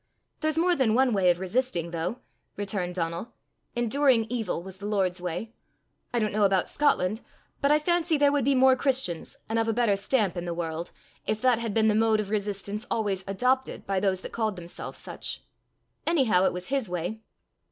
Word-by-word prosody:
"There's 310 -1 0
more 350 +2 +3
than 235 -7 +2
one 255 -1 +4
way 190 -3 +4
of 175 0 +2
resisting, 190 -3 -1
though," 175 +8 -3 0.4
returned 195 -3 -2
Donal. 170 +5 -3 0.4
"Enduring 240 0 +3
evil 225 -8 -2
was 190 0 -10
the 205 - -5
Lord's 190 -3 0
way. 180 +6 -4 0.6
I 245 - -1
don't 215 -3 0
know 215 - 0
about 195 -2 +3
Scotland, 220 -7 +1 0.4
but 280 - +3
I 300 - +6
fancy 335 +1 +1
there 285 0 +4
would 285 -2 +1
be 275 +2 +3
more 260 0 +6
Christians, 255 - -1
and 225 +1 0
of 225 - +1
a 225 - +2
better 230 -3 +3
stamp, 200 -1 +1
in 175 0 -4
the 170 -1 -3
world, 165 0 -3 0.4
if 215 - 0
that 250 -3 +4
had 230 -3 -3
been 220 -1 +4
the 215 - +4
mode 220 0 +3
of 205 -1 -3
resistance 205 0 -3
always 200 -4 -1
adopted 255 +7 0
by 195 -1 0
those 190 -1 0
that - - -7
called 220 -3 -1
themselves 175 -1 -7
such. - - -5 0.6
Anyhow 250 - +3
it - - +3
was 180 0 -6
his 270 -7 0
way." 180 +5 -3
215 Hz, 195 wpm, -27 LUFS, 185-255 Hz, 0.6 s, I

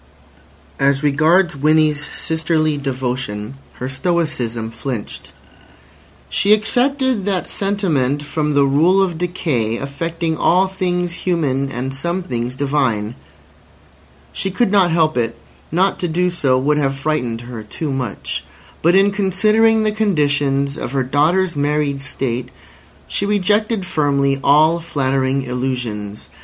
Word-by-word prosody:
As 140 +1 +2
regards 155 +4 +3
Winnie's 150 +1 +2
sisterly 160 -1 0
devotion, 125 -5 -3 0.2
her 125 - -5
stoicism 130 -7 -1
flinched. 115 -1 -6 1.0
She 205 +1 +3
excepted 250 +1 +1
that 195 -3 -1
sentiment 160 -9 0
from 150 0 -1
the 140 -1 +5
rule 160 +8 +3
of 175 -4 -3
decay 150 -11 -1
affecting 165 +4 -3
all 180 +4 +3
things 180 -2 -2
human 150 -7 -1
and 130 +1 -3
some 170 +7 -2
things 125 -4 -3
divine. 130 -6 0 1.2
She 195 - -2
could 200 +2 +1
not 195 -4 +4
help 160 -3 +2
it; 115 -1 0 0.4
not 185 +4 +1
to 175 - -1
do 180 +2 0
so 135 -7 +1
would 150 +3 +1
have 135 -2 0
frightened 130 -6 -2
her 120 -2 -8
too 140 +8 -5
much. 130 -6 -4 0.4
But 170 +3 +4
in 195 +1 +5
considering 215 +3 +3
the 215 - +1
conditions 145 -9 +1
of 125 - -5
her 135 -1 +1
daughter's 165 +7 +1
married 145 -1 0
state, 125 -2 -3 0.6
she 200 - -1
rejected 210 +1 +1
firmly 140 -4 +1
all 155 +4 +4
flattering 135 -4 0
illusions. 125 -5 -4
150 Hz, 125 wpm, -18 LUFS, 135-180 Hz, 1.2 s, the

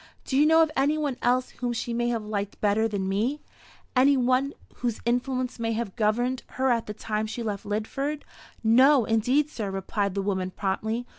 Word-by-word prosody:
Do 265 - -2
you 295 +3 +5
know 320 +1 +6
of 315 - -1
any 290 +3 +2
one 290 -4 -1
else 250 +1 +1
whom 245 -1 -3
she 235 +1 -3
may 240 0 0
have 230 -3 -2
liked 205 -1 -4
better 215 +2 +2
than 200 -3 -2
me 225 +10 0 0.6
any 270 +2 +5
one 255 +3 +1 0.2
whose 240 -3 -2
influence 250 +1 -1
may 225 0 -1
have 220 -3 -3
governed 240 +3 +1 0.2
her 260 0 +2
at 230 -1 0
the 210 - -4
time 215 0 -2
she 235 +2 -5
left 205 -3 -4
Lidford?" 275 +8 -2 0.4
"No, 255 +3 +5
indeed, 250 +7 +2
sir," 210 -4 -4
replied 195 +1 -2
the 200 - -1
woman, 190 -2 -1
promptly. 220 +5 -2
235 Hz, 195 wpm, -26 LUFS, 210-260 Hz, 0.6 s, know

